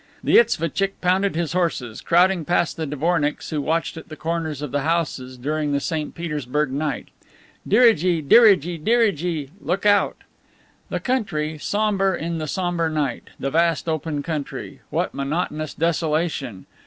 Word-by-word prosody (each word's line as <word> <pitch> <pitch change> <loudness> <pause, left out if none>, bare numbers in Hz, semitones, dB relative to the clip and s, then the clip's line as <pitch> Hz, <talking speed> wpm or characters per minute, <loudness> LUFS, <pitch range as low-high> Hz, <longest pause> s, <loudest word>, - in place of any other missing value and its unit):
The - - +5
isvotchick 195 - +1
pounded 185 +1 +1
his 170 -1 -1
horses, 155 -11 -1
crowding 180 0 +3
past 175 +1 +1
the 160 -1 -3
dvornicks 150 +1 -1
who 150 -2 -1
watched 165 +2 -1
at 160 - -10
the 155 - -7
corners 160 -3 -3
of 145 - -4
the 145 0 0
houses 140 -5 -1
during 150 +3 -1
the 140 - +2
St. 155 +1 -3
Petersburg 150 -4 -2
night. 145 -1 -3 0.6
"Dirigi! 190 -7 +4
dirigi! 175 -2 +5
dirigi! 180 - +1
(Look 180 +7 -1
out!)" 205 -1 +3 0.7
The - - -2
country, 160 - -1
somber 200 0 +1
in 165 0 -3
the 155 - -3
somber 175 0 -1
night. 145 -6 -2
The 135 - -2
vast 165 +1 +2
open 155 -2 -2
country. 155 -3 -5
What - - -1
monotonous 155 +1 -3
desolation! 155 - -1
160 Hz, 145 wpm, -22 LUFS, 150-180 Hz, 0.7 s, The